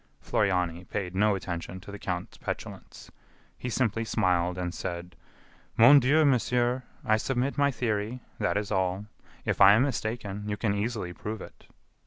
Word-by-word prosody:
Floriani 90 -4 0
paid 90 -1 -4
no 105 +2 +3
attention 90 -1 -5
to 100 - -11
the 100 - -8
count's 90 -1 -4
petulance. - - -7 0.4
He 125 - -5
simply 115 -2 0
smiled 90 -4 +1
and 90 -1 -3
said: 90 -1 -5 0.6
"Mon 125 +6 +9
Dieu, 145 +5 +4
monsieur, 125 -1 +2 0.2
I 110 -3 +4
submit 130 +4 -1
my 140 -1 +3
theory; 115 -2 -2 0.2
that 105 -1 +1
is 105 0 -3
all. 95 +1 0 0.4
If - - -1
I 100 +1 +9
am 110 +5 +4
mistaken, 105 -5 -3
you 105 - -2
can 100 0 0
easily 105 -3 -2
prove 105 +4 -5
it." - - -12
105 Hz, 160 wpm, -28 LUFS, 95-120 Hz, 0.6 s, Mon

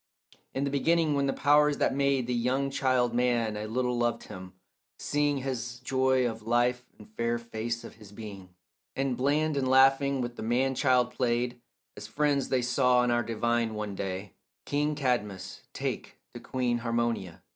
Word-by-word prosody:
In 135 - 0
the 140 - -1
beginning 160 +2 +2
when 140 -1 +1
the - - +2
powers 145 +1 +3
that - - +1
made 140 -2 +1
The 125 - -2
young 130 +3 0
child 130 -3 +1
man 120 -3 +1
a 105 +1 -4
little 125 +2 -1
loved 120 0 0
him, 95 -2 -10 0.4
seeing 145 -1 0
His 125 -3 -4
joy 130 0 +2
of 115 -1 -5
life 120 +2 +1
and 105 - -14
fair 115 +2 -1
face 115 0 -4
of - - -11
his 105 -3 -14
being, 100 -3 -9 0.5
And 135 -1 0
bland 145 +4 +1
and 135 -2 0
laughing 135 +1 +4
with 120 -1 -4
the - - -6
man 125 +4 +1
child 125 -2 +2
played, 120 0 -1 0.3
As 105 0 -8
friends 140 +3 0
they 130 -2 +1
saw 125 0 +3
on 125 0 +1
our 120 0 +2
divine 115 0 -1
one 105 -1 -4
day 95 0 -5 0.3
King 150 +1 0
Cadmus 120 -9 -2
take - - -4 0.2
to - - -7
queen 125 -2 -1
Harmonia. 115 -6 -2
125 Hz, 175 wpm, -28 LUFS, 115-135 Hz, 0.5 s, laughing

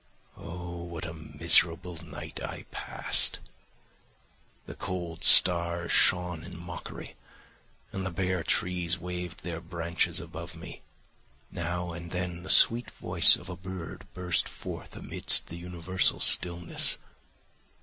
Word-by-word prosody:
Oh! 85 0 -8
What 85 -1 -6
a 85 - -6
miserable 80 +2 +2
night 75 -3 -8
I - - -6
passed! - - -1 1.3
The - - -8
cold 85 -2 -5
stars 85 -1 +4
shone 90 -2 +3
in 90 0 -10
mockery, 85 0 -8 0.8
and 95 - -3
the 95 - -2
bare 95 0 -1
trees 90 +1 0
waved 90 -1 -6
their 85 -1 -5
branches 85 0 -2
above - - -9
me; - - -10 0.7
now 85 +1 -3
and 85 +1 -8
then 90 -1 -4
the 95 - -9
sweet 120 +2 +6
voice - - +6
of - - -11
a 90 - -6
bird 95 +1 -8
burst 90 -2 -1
forth - - -8
amidst - - +2
the 85 - -7
universal 90 +1 0
stillness. 85 -1 +2
85 Hz, 125 wpm, -28 LUFS, 85-90 Hz, 1.3 s, sweet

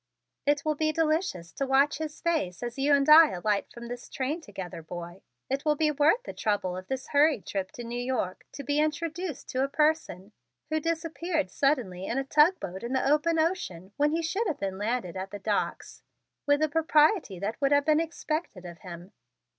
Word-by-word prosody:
"It 290 0 +2
will 310 - +2
be 310 +1 0
delicious 310 - -1
to 275 - -3
watch 275 +3 +3
his 310 -1 -5
face 305 - -1
as 240 +2 -5
you 285 +2 +2
and 280 0 +1
I 310 +1 +9
alight 200 +3 -1
from 235 0 -9
this 245 0 -8
train 285 +6 -3
together, 190 - -8
boy. 175 +2 -8 0.3
It 275 +2 -2
will 300 -1 +2
be 305 0 +2
worth 300 - +3
the - - -7
trouble 200 -4 -1
of 185 0 -8
this 265 0 -4
hurried 290 -5 +3
trip 190 -2 -3
to 240 - -7
New 240 +1 -4
York 245 -7 -2
to 280 - -7
be 290 +3 0
introduced 320 +1 -2
to 260 +1 0
a 275 - -1
person 280 - 0 0.4
who 315 - +2
disappeared 325 0 -2
suddenly 235 -11 0
in 240 - -2
a 270 - +1
tug 305 +6 +4
boat 190 +1 -6
in 235 +2 -4
the 260 0 +1
open 305 +3 +2
ocean 210 - -2
when 295 +1 +2
he 330 +1 -1
should 390 +7 -1
have 320 - -2
landed 205 -2 -2
at 190 +1 -5
the 205 - -6
docks 205 +1 -3 0.5
with 285 +1 +3
the 310 - +4
propriety 310 - +2
that 205 +9 -4
would 275 0 +2
have 285 0 +4
been 310 0 +4
expected 315 - -3
of 170 -1 -9
him." 180 +1 -10
280 Hz, 200 wpm, -28 LUFS, 205-310 Hz, 0.5 s, I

